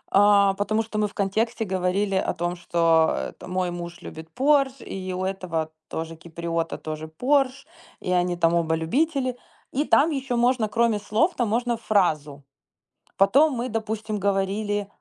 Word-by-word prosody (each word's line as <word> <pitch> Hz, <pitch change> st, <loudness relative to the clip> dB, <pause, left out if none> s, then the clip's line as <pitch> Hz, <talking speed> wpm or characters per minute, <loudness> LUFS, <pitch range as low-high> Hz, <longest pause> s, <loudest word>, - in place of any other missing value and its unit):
а, 200 Hz, -1 st, +6 dB
потому 215 Hz, +3 st, 0 dB
что 220 Hz, -1 st, -6 dB
мы 210 Hz, 0 st, +2 dB
в -, -, -14 dB
контексте 220 Hz, +3 st, -1 dB
говорили 190 Hz, +1 st, 0 dB
о 190 Hz, -, 0 dB
том, 175 Hz, +1 st, -2 dB
что, 165 Hz, -2 st, +2 dB
это, -, -, -13 dB
мой 180 Hz, -1 st, -1 dB
муж 175 Hz, 0 st, -7 dB
любит 160 Hz, +1 st, -9 dB
Porsche, 275 Hz, -1 st, +2 dB
и 185 Hz, -1 st, -5 dB
у 185 Hz, +1 st, -3 dB
этого 170 Hz, -5 st, -3 dB, 0.2 s
тоже 165 Hz, 0 st, -5 dB
киприота, 165 Hz, 0 st, -4 dB
тоже 155 Hz, 0 st, -6 dB
Porsche, 270 Hz, -, +1 dB, 0.3 s
и 180 Hz, -, -4 dB
они 180 Hz, 0 st, +1 dB
там 165 Hz, 0 st, +3 dB
оба 165 Hz, -1 st, +1 dB
любители, 255 Hz, -, 0 dB, 0.3 s
и 290 Hz, +3 st, 0 dB
там 300 Hz, +4 st, +4 dB
ещё 270 Hz, -4 st, -2 dB
можно 240 Hz, -2 st, +2 dB
кроме 230 Hz, -1 st, +2 dB
слов, 220 Hz, -, +1 dB
там 240 Hz, -4 st, 0 dB
можно 235 Hz, +2 st, 0 dB
фразу. 155 Hz, -10 st, 0 dB, 0.7 s
Потом 270 Hz, +10 st, +4 dB
мы, 245 Hz, +2 st, -2 dB
допустим, 220 Hz, -1 st, -3 dB
говорили, 200 Hz, +1 st, 0 dB
200 Hz, 160 wpm, -24 LUFS, 175-235 Hz, 0.7 s, а